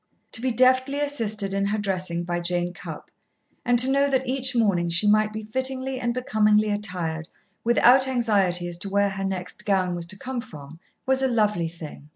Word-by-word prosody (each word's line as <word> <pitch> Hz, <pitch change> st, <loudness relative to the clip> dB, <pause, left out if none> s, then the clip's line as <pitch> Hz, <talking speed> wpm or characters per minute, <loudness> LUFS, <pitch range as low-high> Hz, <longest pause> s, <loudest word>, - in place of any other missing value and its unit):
To 225 Hz, -, +1 dB
be 260 Hz, -, 0 dB
deftly 255 Hz, +3 st, +2 dB
assisted 220 Hz, -9 st, -1 dB
in 200 Hz, 0 st, 0 dB
her 210 Hz, +2 st, -1 dB
dressing 185 Hz, -4 st, -2 dB
by 175 Hz, 0 st, -2 dB
Jane 175 Hz, 0 st, -1 dB
Cupp, -, -, -10 dB, 0.5 s
and 245 Hz, 0 st, +2 dB
to 250 Hz, +2 st, +4 dB
know 280 Hz, +1 st, +2 dB
that 265 Hz, -1 st, 0 dB
each 260 Hz, 0 st, +2 dB
morning 195 Hz, -7 st, +1 dB
she 175 Hz, +5 st, +1 dB
might 215 Hz, +1 st, +3 dB
be 220 Hz, 0 st, -6 dB
fittingly 260 Hz, +3 st, -2 dB
and 240 Hz, -1 st, -1 dB
becomingly 215 Hz, -3 st, +2 dB
attired 180 Hz, -6 st, -3 dB, 0.3 s
without 250 Hz, +3 st, +5 dB
anxiety 200 Hz, -8 st, +1 dB
as 175 Hz, 0 st, -5 dB
to 200 Hz, -, -4 dB
where 200 Hz, 0 st, +1 dB
her 195 Hz, 0 st, -5 dB
next 185 Hz, -2 st, -4 dB
gown 190 Hz, -3 st, 0 dB
was 170 Hz, -1 st, -3 dB
to 195 Hz, -, -3 dB
come 255 Hz, +2 st, -5 dB
from, 155 Hz, -, -12 dB, 0.3 s
was 265 Hz, 0 st, +2 dB
a 265 Hz, -, +3 dB
lovely 210 Hz, -8 st, +1 dB
thing. 155 Hz, -3 st, -11 dB
210 Hz, 195 wpm, -24 LUFS, 180-255 Hz, 0.5 s, without